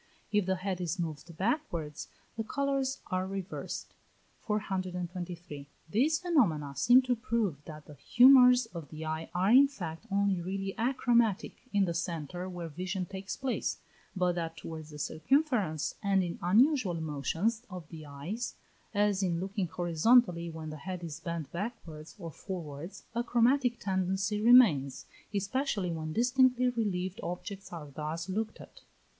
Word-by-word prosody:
If 210 -3 +2
the 190 - +2
head 185 0 -3
is 175 +1 -2
moved 165 -1 -5
backwards 185 - -2 0.3
the 225 - -2
colours 270 +1 -1
are 185 0 0
reversed. 195 -1 -5 0.5
423. 180 -6 -4 0.2
These 290 +9 +3
phenomena 210 - +1
seem 245 - +6
to 255 -1 +1
prove 220 - -1
that 155 -1 -10
the 150 - -12
humours 250 - +7
of 165 -5 -7
the 155 0 -7
eye 160 +1 -3
are 185 +4 +3
in 270 +3 +8
fact 180 - -7
only 200 -2 +1
really 195 +2 -3
achromatic 235 -3 +2 0.2
in 200 -1 +3
the 170 - -2
centre 170 +1 -4
where 175 -2 -5
vision 180 +4 -3
takes 190 +2 -6
place, 265 -2 -1 0.4
but 180 -1 +2
that 165 -1 -4
towards 160 0 -7
the 150 - -10
circumference, 205 - 0
and 195 -2 +2
in 170 -1 -4
unusual 220 - +3
motions 160 +9 -1
of 180 -5 -8
the 155 -2 -9
eyes, 165 +12 -5 0.4
as 205 -1 +2
in 175 -3 0
looking 195 0 -2
horizontally 175 +2 +3
when 160 -1 -7
the 155 - -7
head 180 +3 -6
is 160 -2 -6
bent 165 -3 -5
backwards 170 -6 -6
or 170 -5 -7
forwards, 165 -1 -7
a 235 +1 0
chromatic 245 +1 +2
tendency 190 +2 0
remains, 210 - +5 0.3
especially 205 -1 -1
when 155 -1 -4
distinctly 250 +4 +3
relieved 200 -4 -2
objects 195 +3 -6
are 155 -4 -8
thus 155 +4 -4
looked 215 +3 -2
at. - - -14
185 Hz, 150 wpm, -31 LUFS, 165-230 Hz, 0.5 s, in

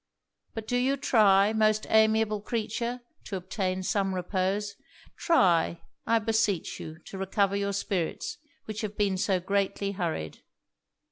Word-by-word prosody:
But 220 -1 -5
do 245 - +1
you 265 +3 +1
try, 210 -6 +4
most 215 -1 +2
amiable 220 -1 +3
creature! 235 +2 -3 0.2
to 200 - -5
obtain 185 0 -2
some 195 0 0
repose 190 +3 -1 0.4
Try, 175 - +2 0.2
I 230 - +4
beseech 220 -5 0
you, 160 0 -8
to 195 - -8
recover 195 +1 +1
your 200 0 -1
spirits, 190 -4 -2 0.3
which 215 -1 -5
have 210 -1 -5
been 200 -2 +1
so 190 0 +1
greatly 200 +1 -1
hurried.' 165 - -4
200 Hz, 135 wpm, -28 LUFS, 190-220 Hz, 0.4 s, try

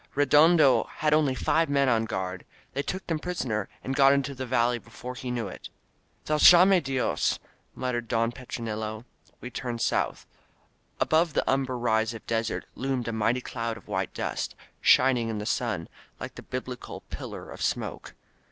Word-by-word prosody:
Redondo 145 0 +5
had 150 0 0
only 150 -4 +3
five 160 +4 +1
men 140 -1 +3
on 115 -3 +2
guard! 95 -3 -4 0.3
They 140 - -1
took 185 +6 -4
them 165 -2 -1
prisoner 125 - -2
and 135 - -2
got 135 0 +6
into 140 0 0
the 130 -1 -5
valley 120 -1 +2
before 120 +2 -9
he 125 0 -6
knew 120 -3 -2
it - - -9 0.3
!" - - -40
Valgaine 180 +4 +7
Diosr* 135 -3 0 0.4
muttered 120 -2 -2
Don 115 0 +1
Petronilo. 110 -3 -5 0.4
We 125 - -7
turned 120 -1 -4
south. - - 0 0.7
Above 160 0 +2
the - - 0
umber 130 -1 +1
rise 115 -1 +1
of 110 - -10
desert 115 -1 -1
loomed 130 -2 -2
a - - -3
mighty 115 +3 +1
cloud 115 -2 -4
of 110 - -16
white - - -2
dust, - - -3 0.3
shining 125 -3 +4
in 110 - -3
the 105 - -4
sun, 105 -8 -1 0.3
like - - -6
the - - -9
biblical 125 -1 -6
pillar - - -7
of - - -9
smoke. - - -3
125 Hz, 170 wpm, -27 LUFS, 115-140 Hz, 0.7 s, Valgaine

